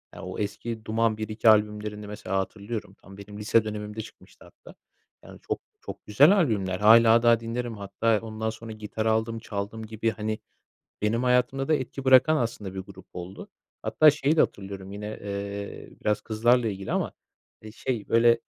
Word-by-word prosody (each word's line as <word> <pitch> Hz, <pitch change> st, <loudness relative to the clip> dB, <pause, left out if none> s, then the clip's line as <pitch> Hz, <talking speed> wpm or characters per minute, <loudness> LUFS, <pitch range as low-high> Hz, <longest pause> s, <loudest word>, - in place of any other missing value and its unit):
ya, -, -, -9 dB
o -, -, -6 dB
eski 110 Hz, +2 st, -4 dB
Duman 110 Hz, 0 st, +1 dB
I, 110 Hz, -, -4 dB
II 110 Hz, +1 st, -2 dB
albümlerini 105 Hz, 0 st, +1 dB
mesela 100 Hz, -2 st, -4 dB
hatırlıyorum. 100 Hz, +1 st, -5 dB
Tam 95 Hz, 0 st, -14 dB
benim 105 Hz, +1 st, -10 dB
lise 110 Hz, +1 st, +3 dB
dönemimde 105 Hz, 0 st, -5 dB
çıkmıştı -, -, -15 dB
hatta. -, -, -16 dB, 0.5 s
Yani, -, -, -13 dB
çok -, -, -1 dB, 0.2 s
çok -, -, -9 dB
güzel 145 Hz, -, +6 dB
albümler. 100 Hz, -, +1 dB
Hâlâ 115 Hz, +2 st, +7 dB
daha 115 Hz, -1 st, +5 dB
dinlerim 115 Hz, 0 st, -4 dB
hatta 105 Hz, +3 st, 0 dB
ondan 110 Hz, 0 st, -4 dB
sonra 110 Hz, 0 st, -8 dB
gitar 110 Hz, 0 st, -5 dB
aldım 110 Hz, +1 st, +1 dB
çaldım 110 Hz, 0 st, -5 dB
gibi. 110 Hz, +1 st, -1 dB
Hani, 110 Hz, 0 st, -3 dB, 0.6 s
benim 110 Hz, +3 st, +1 dB
hayatımda 125 Hz, +2 st, +2 dB
da 155 Hz, -, +4 dB
etki 135 Hz, 0 st, -4 dB
bırakan 130 Hz, +4 st, +6 dB
aslında 105 Hz, -7 st, -3 dB
bir 95 Hz, -, -4 dB
grup 95 Hz, -1 st, -13 dB
oldu. 90 Hz, +2 st, -8 dB, 0.3 s
Hatta 155 Hz, -1 st, +5 dB
şeyi 150 Hz, +2 st, 0 dB
de -, -, +5 dB
hatırlıyorum 95 Hz, -1 st, -2 dB
yine, 105 Hz, +1 st, -6 dB, 0.2 s
eee, 100 Hz, 0 st, -5 dB
biraz 105 Hz, 0 st, 0 dB
kızlarla 120 Hz, +2 st, +2 dB
ilgili 95 Hz, -2 st, -5 dB
ama, -, -, -1 dB, 0.5 s
eee, 110 Hz, -, -10 dB
şey, 115 Hz, -2 st, -4 dB
böyle 115 Hz, 0 st, +4 dB
110 Hz, 170 wpm, -26 LUFS, 105-115 Hz, 0.6 s, Hâlâ